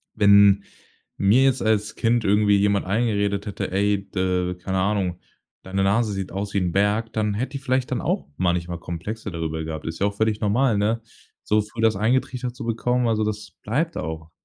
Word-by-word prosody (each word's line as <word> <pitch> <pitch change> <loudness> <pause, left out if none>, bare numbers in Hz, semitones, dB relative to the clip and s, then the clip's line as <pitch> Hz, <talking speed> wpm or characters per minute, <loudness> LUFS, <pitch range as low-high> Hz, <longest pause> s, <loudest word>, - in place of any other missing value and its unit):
wenn 100 -1 +6 0.5
mir 105 +7 +4
jetzt 135 -1 +2
als 110 -1 0
Kind 115 0 +1
irgendwie 105 +1 +3
jemand 100 0 +2
eingeredet 100 -1 0
hätte: 100 -2 -4
„Ey, 100 0 0
d 90 -1 -1
keine 95 +1 -3
Ahnung, 95 -2 0 0.4
deine 95 +1 -1
Nase 105 +2 +2
sieht 95 -1 -4
aus 100 +2 -4
wie 100 - +2
'n 90 -2 -1
Berg,“ 105 +4 +1
dann 105 -1 0
hätte 130 +6 -3
ich 135 - -12
vielleicht 130 -1 0
dann - - -1
auch - - -1
manchmal 90 -1 -1
Komplexe 100 +6 -6
darüber 80 -1 -3
gehabt. 80 -1 -6
Ist 80 0 -5
ja 100 - +2
auch 100 - -4
völlig 110 0 0
normal, 110 +2 +2
ne, 110 +3 0 0.4
so 105 0 +2
früh 105 +2 -7
das 110 -1 +3
eingetrichtert 125 +2 0
zu - - -7
bekommen, 120 +2 0
also, 110 -1 +1
das 105 0 -4
bleibt 155 +10 -1
auch. 80 +1 -5
105 Hz, 190 wpm, -23 LUFS, 95-110 Hz, 0.5 s, wenn